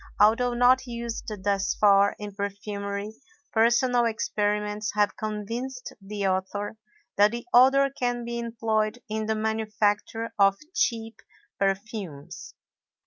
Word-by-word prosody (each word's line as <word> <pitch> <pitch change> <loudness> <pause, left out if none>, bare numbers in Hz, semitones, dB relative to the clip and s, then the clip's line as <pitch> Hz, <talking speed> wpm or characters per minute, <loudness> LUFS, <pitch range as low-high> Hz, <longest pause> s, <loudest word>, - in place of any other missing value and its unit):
Although 240 +4 +4
not 250 +2 +4
used 235 -2 -5
thus 200 -1 +1
far 200 -1 +4
in 205 -1 -7
perfumery, 200 +1 -4 0.4
personal 240 +2 +3
experiments 210 -1 -1
have 210 -1 +2
convinced 230 +5 -5
the 200 0 -4
author 190 +3 -2 0.4
that 205 +1 +6
the 235 +1 -6
odor 270 +3 +6
can 245 -2 -2
be 235 0 -3
employed 225 -1 -1
in 215 0 -2
the 220 - +1
manufacture 220 0 -1
of 195 0 +5 0.2
cheap 225 -7 -1 0.4
perfumes. 195 -6 -4
215 Hz, 115 wpm, -26 LUFS, 205-235 Hz, 0.4 s, that